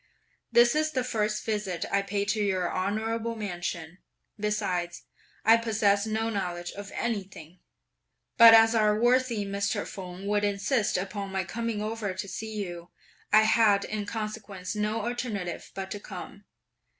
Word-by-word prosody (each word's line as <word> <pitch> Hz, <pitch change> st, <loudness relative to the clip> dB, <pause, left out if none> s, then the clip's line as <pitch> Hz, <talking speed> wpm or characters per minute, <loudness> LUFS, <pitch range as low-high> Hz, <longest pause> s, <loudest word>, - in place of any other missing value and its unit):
This 240 Hz, 0 st, +6 dB
is 310 Hz, 0 st, 0 dB
the 255 Hz, -, 0 dB
first 215 Hz, -3 st, -1 dB
visit 205 Hz, -6 st, -2 dB
I 200 Hz, -, +3 dB
pay 200 Hz, 0 st, -2 dB
to 205 Hz, +2 st, 0 dB
your 185 Hz, -3 st, 0 dB
honourable 220 Hz, +4 st, -1 dB
mansion; 175 Hz, -4 st, -5 dB, 0.4 s
besides, 190 Hz, -5 st, -2 dB, 0.4 s
I 225 Hz, +1 st, +7 dB
possess 215 Hz, -2 st, +1 dB
no 220 Hz, +1 st, -1 dB
knowledge 175 Hz, -4 st, -3 dB
of 200 Hz, 0 st, -9 dB
anything; 190 Hz, -7 st, -4 dB, 0.8 s
but 230 Hz, -1 st, +10 dB
as 225 Hz, 0 st, +6 dB
our 215 Hz, -1 st, +3 dB
worthy 240 Hz, -3 st, +2 dB
Mr. 200 Hz, 0 st, -1 dB
Feng 185 Hz, 0 st, -8 dB
would 205 Hz, 0 st, +1 dB
insist 205 Hz, +2 st, +1 dB
upon 195 Hz, +1 st, -4 dB
my 190 Hz, 0 st, -1 dB
coming 225 Hz, +3 st, -3 dB
over 215 Hz, -3 st, -3 dB
to 200 Hz, +2 st, -4 dB
see 220 Hz, +3 st, -6 dB
you, 175 Hz, -1 st, -8 dB, 0.4 s
I 215 Hz, +1 st, +7 dB
had 220 Hz, -2 st, +4 dB
in 210 Hz, -1 st, -4 dB
consequence 215 Hz, -3 st, -5 dB
no 210 Hz, +2 st, -1 dB
alternative 230 Hz, -7 st, -4 dB
but 195 Hz, 0 st, -5 dB
to 205 Hz, -, -4 dB
come. 200 Hz, +1 st, -9 dB
210 Hz, 150 wpm, -28 LUFS, 195-225 Hz, 0.8 s, but